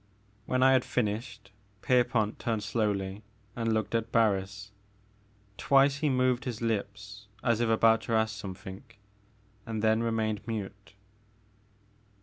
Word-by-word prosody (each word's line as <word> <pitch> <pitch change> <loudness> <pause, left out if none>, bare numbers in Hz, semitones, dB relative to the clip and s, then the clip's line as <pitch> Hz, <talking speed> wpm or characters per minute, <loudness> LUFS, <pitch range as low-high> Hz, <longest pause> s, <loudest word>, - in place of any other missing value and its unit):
When 130 0 +1
I 130 - +6
had 130 -2 +4
finished, 110 -3 -3 0.3
Pierpont 120 -4 +1
turned 110 -3 -2
slowly 100 -2 -1 0.3
and 115 -1 -1
looked 110 0 -1
at 115 -1 -1
Barris. 100 -2 0 0.9
Twice 140 0 +4
he 150 +1 0
moved 130 -1 +1
his 120 -4 -4
lips 105 -2 -4 0.2
as 120 -2 +2
if 120 - +1
about 115 0 +4
to 115 - -2
ask 110 -1 +1
something 95 0 -8 0.8
and 110 -1 -4
then 110 +1 +3
remained 110 -2 -1
mute. 105 -3 -6
110 Hz, 130 wpm, -29 LUFS, 105-120 Hz, 0.9 s, I